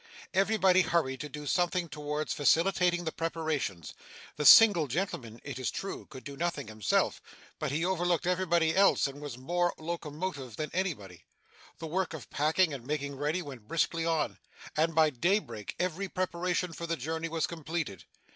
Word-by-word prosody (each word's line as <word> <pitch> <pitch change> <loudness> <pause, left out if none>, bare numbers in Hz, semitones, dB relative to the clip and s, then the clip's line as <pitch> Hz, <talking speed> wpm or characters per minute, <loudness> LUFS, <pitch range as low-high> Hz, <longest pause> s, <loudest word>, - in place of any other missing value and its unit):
Everybody 190 -1 +4
hurried 155 -7 0
to 150 - -5
do 150 +1 -7
something 175 +3 +1
towards 150 0 -3
facilitating 175 +3 +3
the 160 - -2
preparations. 155 - -3 0.4
The 150 - +2
single 200 -9 +9
gentleman, 125 - -3
it 135 -3 -6
is 130 - -1
true, 195 - -5
could 130 -3 -11
do 140 - -8
nothing 155 -5 -2
himself, 110 -2 0 0.4
but 155 -3 -2
he 160 +4 0
overlooked 175 -2 +1
everybody 175 -3 +2
else 195 +1 +5
and 140 +1 -5
was 145 -5 -6
more 175 +7 0
locomotive 155 - -5
than 150 -2 -4
anybody. 135 - -3 0.5
The 165 - -7
work 165 +1 -1
of 145 - -10
packing 155 +3 +2
and 135 -4 -6
making 140 +1 -3
ready 150 +6 -1
went 130 -8 -10
briskly 165 +2 0
on, 165 -2 0 0.4
and 160 +1 +1
by 160 -1 +5
daybreak 160 - -1
every 185 +2 -2
preparation 180 -1 -1
for 170 +1 -6
the 165 0 -1
journey 160 +5 -3
was 165 0 0
completed. 160 - -4
160 Hz, 165 wpm, -30 LUFS, 145-175 Hz, 0.5 s, single